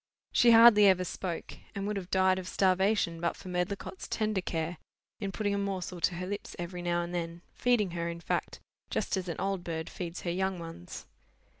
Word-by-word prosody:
She 240 Hz, -, +5 dB
hardly 225 Hz, -3 st, +9 dB
ever 185 Hz, -1 st, +4 dB
spoke, 175 Hz, -1 st, -5 dB, 0.2 s
and 200 Hz, 0 st, -3 dB
would 210 Hz, +1 st, -1 dB
have 185 Hz, -2 st, -5 dB
died 190 Hz, 0 st, +3 dB
of 185 Hz, -, -7 dB
starvation 190 Hz, -2 st, +2 dB
but 170 Hz, -, 0 dB
for 185 Hz, -, -10 dB
Medlicott's 180 Hz, -, -3 dB
tender 215 Hz, -3 st, 0 dB
care, 165 Hz, -1 st, -3 dB, 0.4 s
in 200 Hz, -3 st, -3 dB
putting 205 Hz, 0 st, -1 dB
a 200 Hz, -, 0 dB
morsel 185 Hz, -3 st, -3 dB
to 175 Hz, -, +2 dB
her 180 Hz, +1 st, -4 dB
lips 205 Hz, +2 st, -5 dB
every 175 Hz, +1 st, -5 dB
now 175 Hz, 0 st, 0 dB
and 170 Hz, +1 st, -6 dB
then, 170 Hz, 0 st, -4 dB
feeding 235 Hz, -7 st, +2 dB
her, 170 Hz, 0 st, -2 dB
in 170 Hz, 0 st, -5 dB
fact, -, -, -2 dB, 0.3 s
just -, -, -1 dB
as 190 Hz, -1 st, -3 dB
an 170 Hz, -, -4 dB
old 195 Hz, -1 st, -1 dB
bird 160 Hz, -2 st, -4 dB
feeds 175 Hz, -1 st, -5 dB
her 175 Hz, -, -2 dB
young 190 Hz, +1 st, 0 dB
ones. 165 Hz, -, -8 dB
185 Hz, 200 wpm, -30 LUFS, 175-200 Hz, 0.4 s, hardly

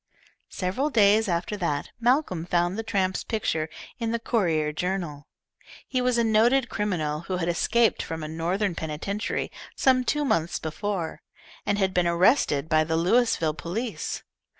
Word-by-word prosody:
Several 195 Hz, +11 st, -1 dB
days 215 Hz, -3 st, +4 dB
after 175 Hz, +3 st, -1 dB
that 150 Hz, -6 st, -2 dB
Malcolm 240 Hz, -, +1 dB
found 175 Hz, +1 st, +1 dB
the 225 Hz, -, -2 dB
tramp's 195 Hz, -4 st, -1 dB
picture 160 Hz, -8 st, -1 dB, 0.3 s
in 230 Hz, -1 st, -1 dB
the 235 Hz, -, 0 dB
Courier 170 Hz, -10 st, 0 dB
Journal. 170 Hz, -4 st, -3 dB, 0.6 s
He 255 Hz, -, 0 dB
was 250 Hz, -1 st, +2 dB
a 235 Hz, -, +3 dB
noted 235 Hz, +4 st, +3 dB
criminal 175 Hz, -9 st, -1 dB
who 185 Hz, -, 0 dB
had 170 Hz, -1 st, -2 dB
escaped 225 Hz, +7 st, +2 dB
from 160 Hz, -1 st, -5 dB
a -, -, -4 dB
Northern 175 Hz, +5 st, -1 dB
penitentiary 165 Hz, +7 st, -3 dB, 0.2 s
some 255 Hz, -1 st, +3 dB
two 295 Hz, +3 st, 0 dB
months 170 Hz, -, +1 dB
before, 170 Hz, +1 st, -4 dB, 0.5 s
and 205 Hz, 0 st, +2 dB
had 190 Hz, -2 st, +1 dB
been 180 Hz, -1 st, +2 dB
arrested 170 Hz, -, +3 dB
by 155 Hz, -1 st, +3 dB
the 160 Hz, +1 st, -1 dB
Louisville 175 Hz, -3 st, +2 dB
police. 215 Hz, +9 st, -4 dB
185 Hz, 150 wpm, -26 LUFS, 165-225 Hz, 0.6 s, days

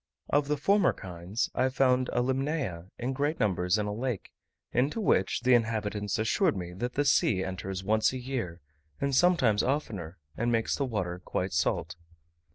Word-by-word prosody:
Of 145 Hz, 0 st, +2 dB
the 150 Hz, 0 st, 0 dB
former 195 Hz, +5 st, +3 dB
kinds, 90 Hz, +4 st, -4 dB
I 130 Hz, -, +2 dB
found 130 Hz, -1 st, +2 dB
a 120 Hz, -, +1 dB
Limnaea 130 Hz, -, -2 dB
in 125 Hz, +2 st, -2 dB
great 145 Hz, +4 st, -1 dB
numbers 90 Hz, -1 st, +2 dB
in 105 Hz, -, -1 dB
a 105 Hz, -, -2 dB
lake, 115 Hz, -3 st, -3 dB, 0.4 s
into 135 Hz, -, +1 dB
which, 95 Hz, -, +2 dB
the 125 Hz, +1 st, +4 dB
inhabitants 105 Hz, -3 st, 0 dB
assured 145 Hz, -, +2 dB
me 90 Hz, -1 st, -5 dB
that 120 Hz, +7 st, -4 dB
the 145 Hz, -, +1 dB
sea 105 Hz, -8 st, +3 dB
enters 95 Hz, 0 st, -4 dB
once 110 Hz, +2 st, +2 dB
a 130 Hz, -, -4 dB
year, 120 Hz, -10 st, -4 dB, 0.4 s
and 140 Hz, 0 st, 0 dB
sometimes 130 Hz, -, +4 dB
oftener, 105 Hz, -, -2 dB, 0.2 s
and 120 Hz, +1 st, 0 dB
makes 115 Hz, -1 st, +1 dB
the 140 Hz, -, -1 dB
water 90 Hz, -8 st, -3 dB
quite 90 Hz, -1 st, -2 dB
salt. 80 Hz, -, 0 dB
115 Hz, 170 wpm, -29 LUFS, 95-135 Hz, 0.4 s, the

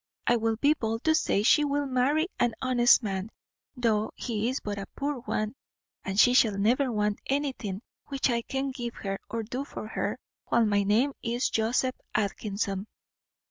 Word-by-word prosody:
I 240 Hz, -, +4 dB
will 225 Hz, -1 st, +1 dB
be 285 Hz, +7 st, +4 dB
bold 225 Hz, -5 st, -3 dB
to 315 Hz, -, +4 dB
say 205 Hz, -9 st, +2 dB
she 300 Hz, +7 st, +5 dB
will 285 Hz, 0 st, 0 dB
marry 275 Hz, +5 st, +2 dB
an 235 Hz, -2 st, +2 dB
honest 250 Hz, -1 st, +4 dB
man, 195 Hz, 0 st, -3 dB, 0.5 s
though 220 Hz, -3 st, +1 dB
he 225 Hz, -1 st, -2 dB
is 260 Hz, -, -2 dB
but 205 Hz, -1 st, -4 dB
a 195 Hz, -, -6 dB
poor 285 Hz, 0 st, -2 dB
one; 215 Hz, -3 st, -2 dB, 0.5 s
and 190 Hz, +1 st, -2 dB
she 245 Hz, +3 st, +7 dB
shall 220 Hz, -5 st, +4 dB
never 245 Hz, +6 st, +2 dB
want 210 Hz, -2 st, 0 dB
anything 260 Hz, -8 st, -2 dB, 0.2 s
which 275 Hz, -2 st, 0 dB
I 235 Hz, -2 st, +1 dB
can 270 Hz, +3 st, -3 dB
give 240 Hz, -3 st, -5 dB
her 195 Hz, -1 st, -4 dB
or 230 Hz, 0 st, -3 dB
do 250 Hz, +5 st, -4 dB
for 280 Hz, -, -7 dB
her, -, -, -2 dB, 0.3 s
while 235 Hz, -1 st, +3 dB
my 205 Hz, -1 st, +2 dB
name 225 Hz, +8 st, +2 dB
is 240 Hz, +2 st, -1 dB
Joseph 240 Hz, +3 st, +1 dB, 0.2 s
Atkinson." 200 Hz, -1 st, -2 dB
235 Hz, 180 wpm, -28 LUFS, 210-260 Hz, 0.5 s, she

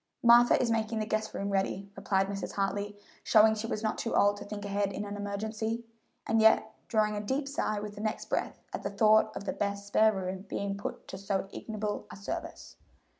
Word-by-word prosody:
"Martha 240 Hz, 0 st, +7 dB
is 240 Hz, -2 st, +1 dB
making 225 Hz, 0 st, 0 dB
the 215 Hz, -, -1 dB
guest 215 Hz, 0 st, -1 dB
room 200 Hz, 0 st, -2 dB
ready," 195 Hz, 0 st, -1 dB
replied 195 Hz, -1 st, +1 dB
Mrs. 195 Hz, 0 st, -5 dB
Hartley, 205 Hz, +1 st, -2 dB, 0.3 s
showing 220 Hz, 0 st, +6 dB
she 220 Hz, +1 st, -3 dB
was 215 Hz, -1 st, -3 dB
not 215 Hz, -, -1 dB
too 230 Hz, -, -2 dB
old 205 Hz, 0 st, +4 dB
to 205 Hz, -, -7 dB
think 205 Hz, 0 st, -6 dB
ahead 200 Hz, 0 st, 0 dB
in 205 Hz, -, -4 dB
an 205 Hz, 0 st, -5 dB
emergency, 220 Hz, +3 st, -3 dB, 0.4 s
and 225 Hz, 0 st, +2 dB
yet 220 Hz, 0 st, +5 dB
drawing 215 Hz, -1 st, +2 dB
a 205 Hz, -, -2 dB
deep 265 Hz, +7 st, -1 dB
sigh 245 Hz, -7 st, -1 dB
with 210 Hz, 0 st, -6 dB
the 205 Hz, -, -8 dB
next 215 Hz, 0 st, -2 dB
breath -, -, -2 dB
at -, -, -3 dB
the 200 Hz, -, -2 dB
thought 215 Hz, +1 st, +4 dB
of -, -, -6 dB
that -, -, -4 dB
best 200 Hz, 0 st, -1 dB
spare 215 Hz, +2 st, +4 dB
room 190 Hz, -1 st, -4 dB
being 200 Hz, 0 st, -2 dB
put 200 Hz, -, -6 dB
to 190 Hz, -, -6 dB
so 195 Hz, -1 st, -1 dB
ignoble 215 Hz, -2 st, -4 dB
a -, -, -9 dB
service. 200 Hz, +1 st, -6 dB
205 Hz, 215 wpm, -30 LUFS, 200-220 Hz, 0.4 s, Martha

